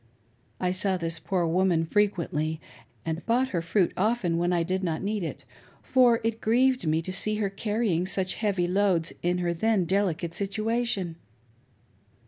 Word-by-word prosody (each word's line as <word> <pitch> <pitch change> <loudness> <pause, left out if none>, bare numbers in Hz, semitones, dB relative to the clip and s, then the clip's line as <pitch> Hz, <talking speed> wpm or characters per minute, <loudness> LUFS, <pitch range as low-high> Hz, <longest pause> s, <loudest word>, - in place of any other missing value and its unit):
I 180 -1 0
saw 190 0 +1
this 165 -2 -3
poor 170 +3 -1
woman 170 -1 +2
frequently, 160 -5 0 0.5
and 165 +1 -3
bought 250 +3 +2
her 175 -7 -1
fruit 170 +2 +1
often 195 -5 +1
when 175 +1 +1
I 175 -1 +2
did 185 +3 -2
not 165 -2 -2
need 210 +1 -1
it, 165 - -5 0.4
for 245 -3 +4
it 225 0 -2
grieved 250 -2 +2
me 160 +1 +1
to 185 - -5
see 215 +3 +1
her 205 -2 -1
carrying 205 -4 -1
such 190 0 0
heavy 200 -5 0
loads 185 -3 +1
in 175 +1 +1
her 170 - +1
then 210 +1 +1
delicate 175 -3 0
situation. 205 -3 -1
185 Hz, 160 wpm, -27 LUFS, 170-215 Hz, 0.5 s, for